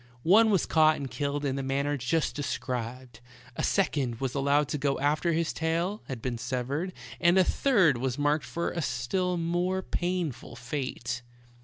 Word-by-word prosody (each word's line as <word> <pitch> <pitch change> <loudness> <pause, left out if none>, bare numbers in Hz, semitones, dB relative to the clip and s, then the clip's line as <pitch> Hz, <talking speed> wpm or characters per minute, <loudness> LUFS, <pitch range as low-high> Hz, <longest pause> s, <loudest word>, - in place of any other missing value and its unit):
One 215 +7 +6
was 195 -6 +3
caught 155 -1 +4
and 135 -3 -6
killed 145 +2 -2
in 135 -1 -1
the - - -1
manner 140 +2 0
just 145 +5 0
described; 125 -3 -4 0.4
a - - -2
second 130 -5 +1
was 130 -2 -2
allowed 140 +1 +2
to 150 - -2
go 140 0 +1
after 150 +5 +1
his 165 0 0
tail 170 +5 -1
had 125 -4 -6
been 120 -3 -2
severed; 130 +8 -2 0.3
and 175 +1 +4
a 190 - +7
third 185 - +3
was 130 +1 -1
marked 145 +1 +1
for 170 - -2
a 170 - -3
still 180 +8 -1
more 175 +3 0
painful 175 -7 -3
fate. 125 -1 -4
145 Hz, 170 wpm, -28 LUFS, 130-170 Hz, 0.4 s, a